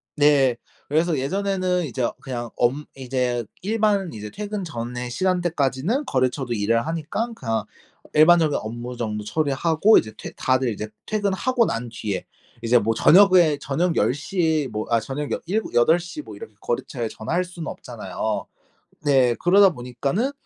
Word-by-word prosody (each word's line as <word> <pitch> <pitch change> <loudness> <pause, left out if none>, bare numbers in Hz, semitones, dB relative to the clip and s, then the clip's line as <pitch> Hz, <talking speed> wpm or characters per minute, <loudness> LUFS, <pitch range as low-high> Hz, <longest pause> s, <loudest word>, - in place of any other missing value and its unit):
네. 145 -4 +4 0.3
그래서 160 +1 +1
예전에는 185 +4 0
이제 130 -2 -4
어 120 - 0
그냥 120 -4 -5
엄 135 +5 +1
이제 125 -2 -1 0.2
일반 205 -2 +1
이제 105 -1 -7
퇴근 205 0 -4
전에 125 -5 -5
시간대까지는 175 - 0
거래처도 130 - 0
일을 115 +3 +1
하니깐 170 +9 -3
그냥 115 - -2 0.5
일반적인 155 -1 +5
업무 120 +3 -6
정도 105 -3 -3
처리하고 160 - +3
이제 110 - 0
퇴 - - -7
다들 130 -1 +1
이제 105 -1 -4 0.2
퇴근하고 215 +4 +1
난 120 - -3
뒤에 105 -4 -4 0.4
이제 120 +1 +4
뭐 115 +1 0
저녁에 180 - +6
저녁 165 +5 0
10 - - +3
시에 155 -1 0
뭐 105 -1 -4
아 115 -1 +3
저녁 145 +4 -4
여 - - -2
7-8 175 - +2
시 175 - -7
뭐 - - -11
이렇게 455 - -10
거래처에 135 - -3
전화할 170 +14 -2
수는 175 -2 -8
없잖아요. - - -4 0.6
네. 130 -4 +4
그러다 195 +3 +6
보니까는 140 - -2
145 Hz, 315 characters per minute, -23 LUFS, 120-180 Hz, 0.6 s, 저녁에